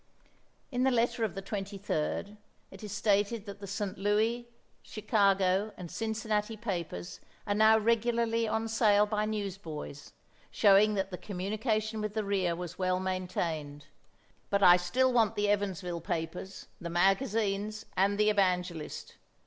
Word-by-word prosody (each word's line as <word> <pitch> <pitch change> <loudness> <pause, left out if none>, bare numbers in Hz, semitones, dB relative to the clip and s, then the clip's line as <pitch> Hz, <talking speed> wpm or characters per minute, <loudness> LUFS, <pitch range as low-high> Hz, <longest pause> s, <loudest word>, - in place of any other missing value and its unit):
In 250 -1 -1
the 265 - +4
letter 235 -1 +1
of 215 -4 -1
the 195 - -5
23d 200 -1 -3 0.4
it - - -12
is 210 - -6
stated 210 +1 +1
that 200 -1 -8
the 200 - -8
St. 195 -1 -4
Louis, 220 +4 +1 0.3
Chicago, 200 -2 +1
and 175 -3 -8
Cincinnati 220 -1 -2
papers 155 - -5 0.3
are 205 - 0
now 220 +1 +6
regularly 230 +1 +1
on 220 +1 -1
sale 210 -2 +4
by 210 0 -1
newsboys, 190 -9 -5 0.4
showing 210 +1 +5
that 195 0 -2
the 180 - -6
communication 215 +3 -2
with 210 0 -4
the 215 - 0
rear 190 -4 0
was 175 +1 -7
well 185 0 +1
maintained, 170 -6 -3 0.6
but 200 -1 +1
I 180 -1 +9
still 250 +9 +1
want 225 -2 +3
the 205 0 +1
Evansville 190 -4 -1
papers, 175 +2 -5
the 170 - -5
magazines 205 +3 +1
and 200 +2 +2
the 210 0 +4
"Evangelist." 180 -5 -1
205 Hz, 140 wpm, -30 LUFS, 185-215 Hz, 0.6 s, I